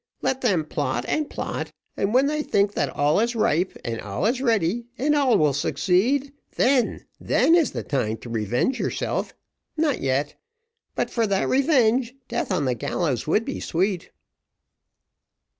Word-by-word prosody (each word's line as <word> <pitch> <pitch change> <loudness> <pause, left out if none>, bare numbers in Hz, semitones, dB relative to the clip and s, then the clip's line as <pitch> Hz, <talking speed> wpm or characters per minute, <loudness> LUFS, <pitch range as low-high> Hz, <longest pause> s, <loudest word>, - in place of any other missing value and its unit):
Let 265 0 0
them 185 -11 +1
plot - - -2
and 305 -1 -1
plot, - - -4 0.2
and 195 - 0
when 260 +4 +4
they 300 +1 0
think 205 -7 +1
that 145 - 0
all 145 +6 +2
is 235 +2 0
ripe, 185 -4 +1
and 115 -1 -3
all 105 - -3
is 245 +4 +1
ready, 230 -2 +1
and 295 +4 +1
all 270 -6 +4
will 150 -4 +3
succeed 230 - +1 0.2
then 255 -1 +2
then 330 - +3
is 340 -3 +4
the - - -4
time 115 -6 -1
to 120 - -9
revenge 120 - 0
yourself - - -2 0.4
not 305 -3 +1
yet 135 +2 0 0.6
but - - -1
for 230 -2 +1
that 195 -1 +1
revenge, 255 -3 +2
death - - -2
on 170 -6 +1
the 130 - +1
gallows 130 +2 -2
would 210 +8 +2
be 275 - -4
sweet." 185 +1 -1
210 Hz, 160 wpm, -24 LUFS, -, 0.6 s, when